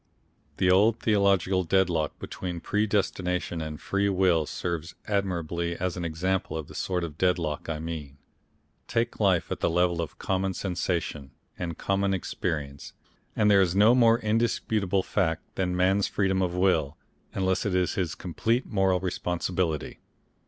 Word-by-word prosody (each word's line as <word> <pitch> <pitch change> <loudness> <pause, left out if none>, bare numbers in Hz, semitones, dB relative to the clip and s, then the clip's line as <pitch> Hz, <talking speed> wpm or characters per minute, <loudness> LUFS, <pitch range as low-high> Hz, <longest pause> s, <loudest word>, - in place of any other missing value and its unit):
The 90 -1 +3
old 105 +5 +4
theological 100 -3 +2
deadlock 85 -3 +1
between 90 -2 -5
predestination 95 -4 -1
and 80 -1 -5
free 100 0 0
will 90 -5 +2
serves 85 -1 -4
admirably 85 -4 -1
as 90 0 -2
an 90 - -4
example 85 +2 -1
of 80 -3 -5
the - - -12
sort 90 -2 -2
of 80 -3 -6
deadlock 85 -5 0
I 80 - -2
mean. 75 -3 -6 0.7
Take 115 +1 -1
life 95 -5 +2
at - - -2
the - - +1
level 85 0 +2
of 80 - -6
common 95 0 -1
sensation 85 -6 -2 0.3
and 85 -2 -5
common 100 0 0
experience 75 -6 -4 0.4
and 105 -1 +4
there 100 -1 +6
is 90 -1 +1
no 105 +4 +6
more 115 -2 +5
indisputable 110 -4 0
fact 80 -6 0
than 90 -1 -1
man's 95 +2 +3
freedom 95 -2 0
of 90 -1 -1
will, 85 -6 +1 0.4
unless 95 -1 +1
it 100 -3 -1
is 90 -1 +1
his 90 -3 -2
complete 115 +9 -1
moral 95 -3 +1
responsibility. 90 -2 -2
90 Hz, 150 wpm, -27 LUFS, 85-95 Hz, 0.7 s, there